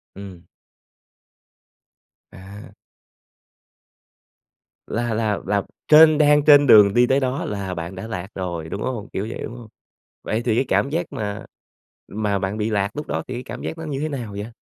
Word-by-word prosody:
Ừm. 95 -3 -11 1.9
À! 100 +2 -13 2.1
Là 120 0 -2
là 110 -2 -1
là 100 0 0 0.2
trên 155 0 +7
đang 150 -1 +4
trên 145 -1 +7
đường 105 -4 +7
đi 120 +2 +4
tới 135 +2 +3
đó 130 0 -2
là 100 -2 -4
bạn 85 +1 -6
đã 95 +4 -7
lạc 95 -4 -5
rồi, 85 -4 -5
đúng 100 - -5
hông, 120 -5 -4
kiểu 100 +3 -3
vậy, - - -7
đúng 115 - -7
hông? 120 -2 -11 0.6
Vậy 110 - -2
thì 115 -3 +1
cái 130 - +1
cảm 135 - +1
giác 165 +4 -2
mà 105 0 -5 0.7
mà 105 -1 -1
bạn 95 +2 -3
bị 110 0 -1
lạc 100 -2 0
lúc 150 - -5
đó - - -3
thì 130 - -5
cái 125 +1 -5
cảm - - -8
giác 165 - -5
nó 160 - -7
như 140 -3 -4
thế 155 +2 -2
nào 120 -7 -5
vậy? 100 +1 -5
110 Hz, 180 wpm, -22 LUFS, 100-135 Hz, 2.1 s, trên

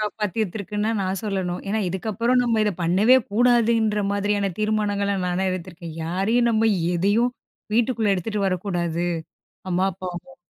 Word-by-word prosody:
காப்பாத்திருக்குன்னு 210 0 -2
தான் 225 -2 0
நான் 190 0 -2
சொல்லணும். 190 -4 -2
ஏன்னா 220 +2 0
இதுக்கப்புறம் 225 +7 0
நம்ம 230 -2 +1
இத 210 - +2
பண்ணவே 195 +9 +5 0.2
கூடாதுன்ற 230 -2 +3
மாதிரியான 205 0 0
தீர்மானங்கள 205 -2 0
நானே 180 +2 0
எடுத்துருக்கேன். 170 -2 -6
யாரயும் 205 +8 +1
நம்ம 225 0 +3 0.3
எதயும் 205 +8 +2 0.4
வீட்டுக்குள்ளே 230 -3 +2
எடுத்துட்டு 200 +2 -1
வரக்கூடாது. 175 -2 -1 0.7
அம்மா, 180 +1 +1
அப்பாவும். 185 +9 -8
205 Hz, 125 wpm, -23 LUFS, 185-220 Hz, 0.7 s, பண்ணவே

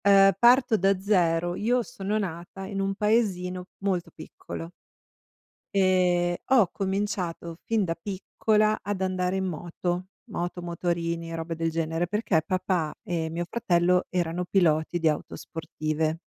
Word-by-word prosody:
Ehm, 195 -1 +6
parto 240 -1 +5
da 195 +1 +3
zero, 175 -3 +2
io 240 +5 +1
sono 210 -4 -3
nata 180 0 -5
in 195 0 -4
un 195 0 0
paesino 190 -4 0 0.2
molto 185 -3 -1
piccolo 165 - -8 1.0
ehm, 180 -2 +3 0.2
ho 235 -8 +6
cominciato 190 -4 -2
fin 225 -2 +1
da 165 -3 0
piccola 215 +3 0
ad 200 -1 -3
andare 185 0 0
in 190 0 0
moto, 175 +1 -3 0.3
moto, 175 -1 -3
motorini, 170 -1 -2
robe 165 0 -4
del 165 0 0
genere, 165 +1 -1
perché 195 -4 +1
papà 180 -4 0
e 165 -2 -2
mio 170 +2 -3
fratello 180 -5 +2
erano 175 0 -1
piloti 175 -2 +2
di 165 -1 +3
auto 150 - -3
sportive. 155 -1 -3
180 Hz, 135 wpm, -27 LUFS, 170-195 Hz, 1.0 s, Ehm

